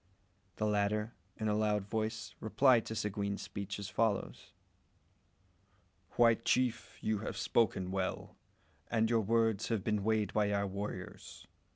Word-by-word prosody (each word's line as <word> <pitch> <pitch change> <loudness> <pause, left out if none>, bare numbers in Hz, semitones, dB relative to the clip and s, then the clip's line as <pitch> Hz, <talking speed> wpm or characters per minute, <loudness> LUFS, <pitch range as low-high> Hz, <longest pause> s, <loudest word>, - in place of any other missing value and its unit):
The 110 - -1
latter 105 +2 0 0.2
in 110 - -2
a 105 - +2
loud 105 -2 +1
voice 110 +1 -3
replied 120 +1 +3
to 110 - -4
Seguin's 100 -1 -2
speech 100 -1 -5
as 100 -1 -5
follows 105 +1 -1 1.7
"White 115 -2 +5
chief! 125 -2 0
you 110 -1 0
have 110 - -5
spoken 95 -5 +1
well, 95 -1 -3 0.5
and 115 0 +2
your 115 -1 +4
words 115 0 +1
have 110 -5 -1
been 105 -1 0
weighed 110 -1 +1
by 105 -1 +2
our 100 0 +1
warriors. 100 +1 -6
105 Hz, 140 wpm, -33 LUFS, 100-110 Hz, 1.7 s, White